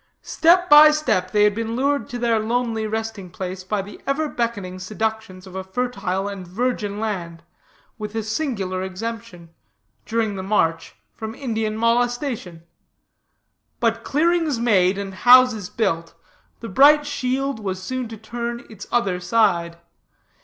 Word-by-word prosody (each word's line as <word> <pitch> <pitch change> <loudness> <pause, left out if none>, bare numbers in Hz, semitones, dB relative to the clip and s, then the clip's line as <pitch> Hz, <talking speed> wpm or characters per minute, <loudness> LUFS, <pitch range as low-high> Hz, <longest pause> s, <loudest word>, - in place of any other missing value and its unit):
Step 355 +2 +3
by 300 0 +9
step 300 -12 0
they 210 -1 +3
had 210 0 +4
been 225 +1 -3
lured 280 +3 0
to 245 - -5
their 235 -2 +1
lonely 225 0 -1
resting 220 -3 -4
place 185 +1 -6
by 200 +1 -2
the 200 - -12
ever 295 +3 0
beckoning 205 -9 -3
seductions 215 -1 -4
of 190 - -12
a 190 0 -4
fertile 195 -2 -2
and 195 -3 -7
virgin 210 0 -2
land, 175 -7 -4 0.6
with 210 0 -6
a 225 - -1
singular 215 -6 -2
exemption, 190 -2 -6 0.6
during 220 -2 -1
the 190 - -4
march, 175 -5 0 0.2
from 220 0 -7
Indian 225 -5 -2
molestation. 235 - -1 1.2
But 230 -1 0
clearings 325 -1 +1
made 200 -5 +3
and 200 -1 -5
houses 245 -2 +5
built, 180 -7 -2 0.5
the 230 - -6
bright 290 +8 +6
shield 270 -2 -2
was 190 -3 -4
soon 255 +6 -4
to 225 0 -9
turn 235 +2 -5
its 205 -3 -10
other 195 -7 +1
side. 175 -4 +1
220 Hz, 145 wpm, -22 LUFS, 190-245 Hz, 1.2 s, by